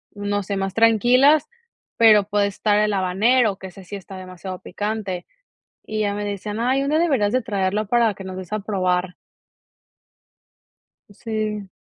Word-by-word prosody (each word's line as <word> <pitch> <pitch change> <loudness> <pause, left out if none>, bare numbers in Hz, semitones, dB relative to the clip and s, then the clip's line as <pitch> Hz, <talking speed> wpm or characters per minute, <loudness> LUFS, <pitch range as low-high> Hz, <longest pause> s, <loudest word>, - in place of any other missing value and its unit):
no 205 0 -2
sé, 200 +1 -3
más 195 -1 -2
tranquilas, 250 +7 +4 0.5
pero 215 -3 +6
puede 205 0 +1
estar 205 +1 +1
el 210 0 +1
habanero, 200 +4 +2
que 190 - -9
ese 190 +1 -13
sí 200 - -7
está 190 0 -11
demasiado 185 0 -8
picante. 205 -2 -4 0.6
Y 215 0 -4
ya 205 -1 0
me 205 0 -4
decían: 205 +1 -4
"Ay, 260 +3 +1
un 275 - -2
día 310 - +2
deberías 265 -12 +1
de 255 0 +1
traerlo 205 -1 -1
para 235 -2 +2
que 195 - -10
nos 185 0 -7
des 185 +1 -9
a 215 - -1
probar". 185 -3 -1 2.0
Sí. 215 -1 -4
205 Hz, 165 wpm, -22 LUFS, 190-220 Hz, 2.0 s, pero